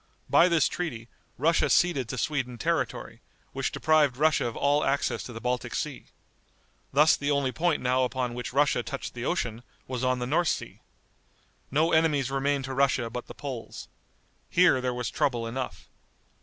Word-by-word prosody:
By 175 - +6
this 170 -3 +3
treaty, 120 -10 -5 0.3
Russia 165 +5 +2
ceded 140 -10 +2
to 130 - -4
Sweden 125 -1 -2
territory, - - -2 0.3
which - - -2
deprived 150 -5 +2
Russia 155 -3 +2
of 115 - -6
all 145 +1 +2
access 140 +1 0
to - - -8
the 115 - -7
Baltic 125 +1 -2
Sea. - - -4 0.8
Thus 150 +3 +5
the 145 - -3
only 140 -2 +1
point 165 +1 0
now 130 +1 +2
upon 125 -1 -2
which 125 +1 -5
Russia 145 +3 +2
touched - - -6
the - - -5
ocean, 115 -1 -2 0.3
was 130 -1 -4
on 130 0 +2
the 125 - -3
North 165 +6 +1
Sea. - - -3 0.9
No 155 +5 +2
enemies 150 -5 +2
remained 135 0 0
to 135 - -5
Russia 130 -3 +1
but 125 +1 -6
the - - -10
Poles. 130 -5 -7 0.6
Here 175 -7 +4
there 125 0 -1
was 125 -2 -3
trouble 120 -4 0
enough. 125 +2 -5
135 Hz, 170 wpm, -27 LUFS, 125-150 Hz, 0.9 s, By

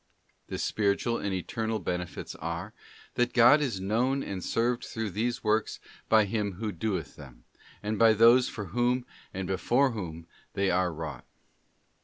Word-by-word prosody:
The - - -4
Spiritual 110 +3 0
and 100 - -2
Eternal 110 +4 -2
benefits 90 -3 -4
are, 85 +6 -5 0.4
that 120 0 0
God 125 +5 +7
is 125 -10 -1
known 120 +8 0
and 95 -3 -5
served 120 +1 0
through 110 -3 -4
these 120 +5 -2
works 110 0 0 0.3
by 110 -1 +5
him 100 -1 -2
who 105 +4 -4
doeth 90 -2 -3
them, - - -13 0.4
and 105 0 -2
by 115 -1 +7
those 115 +3 +6
for 105 - -6
whom 125 +1 +1 0.3
and 95 0 -4
before 125 +8 +2
whom 85 -7 -6 0.3
they 100 -1 +1
are 90 0 +1
wrought. 75 -5 -7
110 Hz, 155 wpm, -28 LUFS, 95-120 Hz, 0.4 s, God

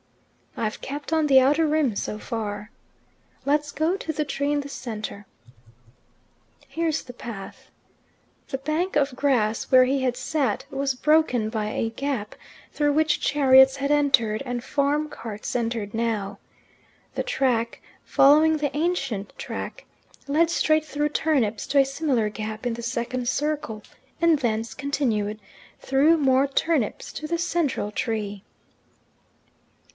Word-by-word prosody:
"I've 215 -1 -3
kept 290 +3 -5
on 315 -1 +3
the 270 -2 +7
outer 290 +5 +3
rim 295 -7 +1
so 210 - -3
far." 210 -2 -5 0.7
"Let's 290 +1 +1
go 320 +5 0
to 325 - -4
the 305 -1 -2
tree 285 0 -1
in 295 0 +1
the 280 - -8
centre." 215 -6 -6 1.4
"Here's 325 -1 -1
the 245 - -10
path." 210 -5 -9 0.8
The 270 - -2
bank 310 +7 -2
of 275 -3 +1
grass 240 -6 +1
where 255 -1 +6
he 270 +1 0
had 250 -1 0
sat 265 -5 -1
was 275 -1 -1
broken 275 -6 +2
by 215 -2 -2
a 225 +1 -1
gap, 255 -4 -3 0.4
through 290 -1 +1
which 310 0 +2
chariots 265 -2 +6
had 280 +1 -1
entered, 275 -7 +3
and 245 -1 -3
farm 290 +2 0
carts 225 -7 -7
entered 230 -3 -2
now. 225 -3 -2 0.8
The - - -1
track, 250 - 0 0.2
following 310 +3 +5
the 290 -2 -2
ancient 275 - -1
track, - - -6 0.4
led 320 +4 +3
straight 310 -2 +2
through 295 0 -1
turnips 265 -9 0
to 280 - +3
a 275 - +6
similar 275 -5 0
gap 215 +2 -6
in 240 - 0
the 235 +1 -7
second 240 +1 -3
circle, 290 -7 -2 0.4
and 335 -3 +4
thence 225 -3 -1
continued, 230 -7 -1 0.4
through 290 +5 +3
more 270 -2 +3
turnips, 275 -4 -1
to 305 - -5
the 335 +2 -1
central 320 -11 -1
tree. 210 -3 -3
270 Hz, 140 wpm, -24 LUFS, 225-295 Hz, 1.4 s, the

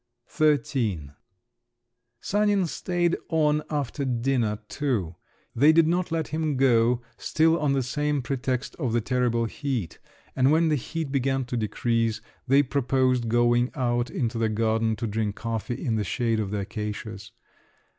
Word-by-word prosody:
XIII 115 - +1 1.1
Sanin 205 -2 +2
stayed 175 +1 0
on 150 -2 +2
after 145 -1 -2
dinner 120 -4 0
too. 115 - -2 0.4
They 145 +6 +6
did 165 0 +5
not 175 +1 0
let 160 -2 -1
him 155 -3 -1
go, 120 -2 +3
still 160 +1 +2
on 145 -2 +1
the 135 -1 +1
same 145 +2 -1
pretext 130 -1 -2
of 130 -8 -2
the 120 - +2
terrible 120 -1 0
heat; 120 - -4 0.4
and 130 +1 +3
when 160 +1 +3
the 155 - +3
heat 150 +2 -4
began 135 -1 0
to 120 - -4
decrease, 115 0 0 0.3
they 140 +2 +5
proposed 130 -3 +1
going 120 +1 +3
out 120 -2 0
into 115 -2 -2
the 110 -1 +1
garden 110 +1 +1
to 115 - -4
drink 105 -1 -2
coffee 115 +1 -3
in 115 -3 +1
the 105 - 0
shade 115 +4 0
of 105 -3 -2
the 105 0 -2
acacias. 105 0 -6
125 Hz, 150 wpm, -26 LUFS, 115-145 Hz, 1.1 s, They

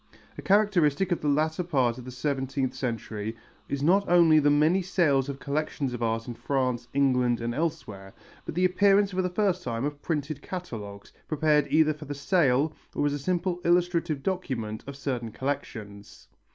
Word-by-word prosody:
A - - -7
characteristic 195 -4 +2
of 175 - 0
the 150 - -2
latter 155 +4 +1
part 130 -8 0
of 125 - -10
the 130 - -7
seventeenth 135 0 -2
century 110 -2 -4 0.3
is 140 0 -2
not 195 +5 +3
only 170 -3 +6
the 145 -1 +3
many 155 +6 +3
sales 150 -7 +1
of 140 - -4
collections 140 -2 -2
of 120 - -5
art 115 0 -1
in 120 - -4
France, 125 -1 -1
England 125 -3 +2
and 120 0 -2
elsewhere, 120 -11 -4 0.3
but - - -7
the 180 +1 +3
appearance 200 +2 +4
for 185 0 0
the 180 - -1
first 185 -1 0
time 115 +1 -2
of 145 0 -4
printed 150 -3 -3
catalogues, 105 - -7
prepared 150 -1 +2
either 155 0 +4
for 150 0 -11
the 145 0 -5
sale 145 -1 +2 0.2
or - - +1
as 145 - +1
a 145 - -3
simple 180 +3 -1
illustrative 170 -4 +1
document 125 - -3
of 140 -1 -7
certain 125 -5 -3
collections. 110 -6 -6
145 Hz, 180 wpm, -27 LUFS, 125-170 Hz, 0.3 s, only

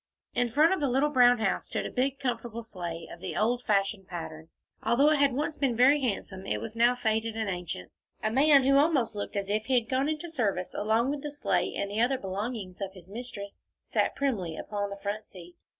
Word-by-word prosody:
In 245 0 +1
front 305 +9 +4
of 380 - -1
the 285 -3 +1
little 270 +4 +2
brown 245 -2 +6
house 220 - -1
stood - - -2
a - - -4
big 270 +2 0
comfortable 235 -3 -3
sleigh 175 -6 -6
of 170 - -11
the 185 - -4
old 240 +3 +1
fashioned 195 -3 0
pattern. 160 -2 -7 0.3
Although 260 +7 +4
it 305 - +3
had 280 -1 +4
once 295 +3 -1
been 265 -4 +1
very 270 +5 +5
handsome, 195 -5 -3
it - - -1
was 225 0 -7
now 240 +2 +4
faded 225 -1 -1
and 220 -1 -1
ancient. 175 - -4 0.3
A 215 - +1
man 280 +2 +6
who 275 +1 +5
almost 285 -6 +3
looked 205 0 -5
as 200 -1 -1
if 210 +2 0
he 265 - +1
had 225 - -13
gone 265 +3 +1
into 310 +2 -4
service 200 - -1
along 225 +5 +1
with 290 -1 -3
the 295 - -4
sleigh 290 0 -1
and 200 0 -2
the 215 +2 0
other 255 +3 +3
belongings 200 -2 -5
of 195 -1 -4
his 185 -1 -14
mistress, 205 -3 -7 0.2
sat - - 0
primly 200 - -1
upon 205 -1 -3
the 200 - -6
front 205 +2 -4
seat. 175 -2 -13
225 Hz, 225 wpm, -29 LUFS, 200-265 Hz, 0.3 s, brown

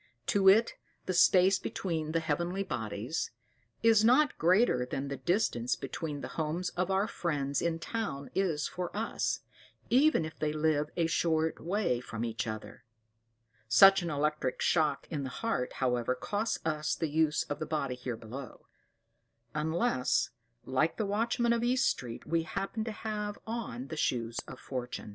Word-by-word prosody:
To 195 -1 +6
it 220 +4 +5 0.3
the 185 - -1
space 185 +1 +5
between 160 -4 -3
the 165 0 +1
heavenly 170 +5 -1
bodies 115 - -3 0.5
is 225 -2 +6
not 275 +6 +5
greater 180 - +4
than 135 +2 -4
the 140 - -3
distance 125 - +1
between 150 +2 -5
the - - -4
homes 160 +4 -1
of 180 +1 -2
our 195 +2 +2
friends 145 -8 -1
in 170 -1 0
town 165 -7 -4
is 170 -6 0
for 180 -1 -4
us, 225 +1 -1 0.5
even 270 - +4
if 155 0 -9
they 150 -1 0
live 150 -1 +1
a 170 - +3
short 160 -1 +1
way 175 - 0
from 115 -2 -5
each 115 0 -3
other; 110 +1 -7 0.8
such 195 - +7
an 170 - -3
electric 150 -3 -1
shock 150 -4 +2
in 150 -3 -2
the 135 - -4
heart, 225 - -2
however, 125 -1 0
costs 205 - -1
us 155 -1 0
the 165 - -1
use 155 0 +2
of 145 - -5
the 155 - -3
body 150 -4 -1
here 125 -2 -5
below; 120 +4 -9 0.9
unless, 155 - +1 0.3
like 135 +5 +1
the 220 - 0
watchman 235 +3 +1
of 235 0 0
East 255 +2 +3
Street, 120 -2 -3
we 165 0 +1
happen 195 +6 -3
to 225 - -4
have 210 -1 -4
on 220 - -4
the 160 - -5
Shoes 115 -5 -1
of - - -9
Fortune. 125 -4 -5
160 Hz, 160 wpm, -31 LUFS, 135-195 Hz, 0.9 s, such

